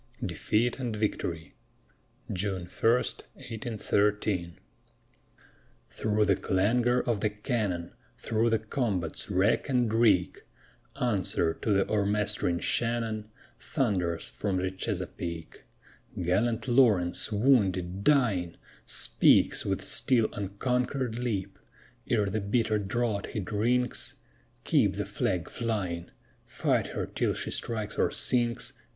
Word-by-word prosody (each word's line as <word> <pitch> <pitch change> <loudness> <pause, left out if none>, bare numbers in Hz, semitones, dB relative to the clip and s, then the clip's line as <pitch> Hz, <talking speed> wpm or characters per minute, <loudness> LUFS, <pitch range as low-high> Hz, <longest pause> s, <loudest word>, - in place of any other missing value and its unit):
DEFEAT 115 +4 0
AND 120 -4 -2
VICTORY 85 -7 -3 0.8
[June 95 -1 -2
1, 110 +5 +1
1813] 105 - -1 1.3
Through 105 -1 +1
the 100 -2 +3
clangor 120 +8 +2
of 115 -4 -1
the 105 - +1
cannon, 105 -5 -2 0.3
Through 115 +1 0
the 115 - +3
combat's 110 - -2
wreck 100 +8 +2
and 120 -4 +1
reek, 105 -6 +3 0.6
Answer 95 -8 +1
to 110 - -3
th' 100 -1 +3
o'ermastering 100 -4 +1
Shannon 115 -2 -1 0.3
Thunders 90 - -1
from 95 +10 -2
the 95 0 -1
Chesapeake: 85 -4 -5 0.5
Gallant 110 +8 0
Lawrence, 110 -9 +3
wounded, 100 -6 +2
dying, 105 - +2 0.3
Speaks - - +3
with - - -1
still 120 -4 +2
unconquered 125 +4 -2
lip 110 -6 -3 0.5
Ere 105 -3 +2
the 100 +2 -2
bitter 110 +1 +1
draught 105 +1 -1
he - - -4
drinks: 110 - -1 0.5
_Keep - - +3
the - - -1
Flag 90 -3 -1
flying! 95 -7 -3 0.4
Fight - - 0
her - - -3
till - - -1
she - - -3
strikes 110 -3 -2
or - - +3
sinks! 120 -2 +2
105 Hz, 110 wpm, -29 LUFS, 95-120 Hz, 1.3 s, the